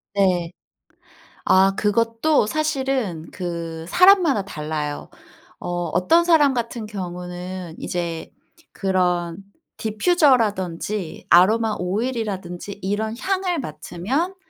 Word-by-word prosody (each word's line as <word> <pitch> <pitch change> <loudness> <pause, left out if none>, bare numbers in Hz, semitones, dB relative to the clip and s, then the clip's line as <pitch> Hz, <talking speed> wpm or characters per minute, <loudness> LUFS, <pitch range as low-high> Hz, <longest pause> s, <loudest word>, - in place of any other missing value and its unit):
네. 180 -4 +2 1.0
아 190 +1 +5
그것도 230 +6 +2
사실은 265 - -1
그 165 -2 -5
사람마다 360 - +5
달라요. 150 -5 -4 0.5
어 - - -6 0.3
어떤 325 - +4
사람 310 -5 +5
같은 235 -2 -3
경우는 180 -2 -6
이제 170 -2 -4 0.4
그런 180 -3 0 0.4
디퓨저라든지 215 - +1
아로마 215 +5 +5
오일이라든지 200 -2 -3
이런 210 +3 -1
향을 370 -1 -1
맡으면 220 - -3
200 Hz, 215 characters per minute, -22 LUFS, 175-255 Hz, 1.0 s, 아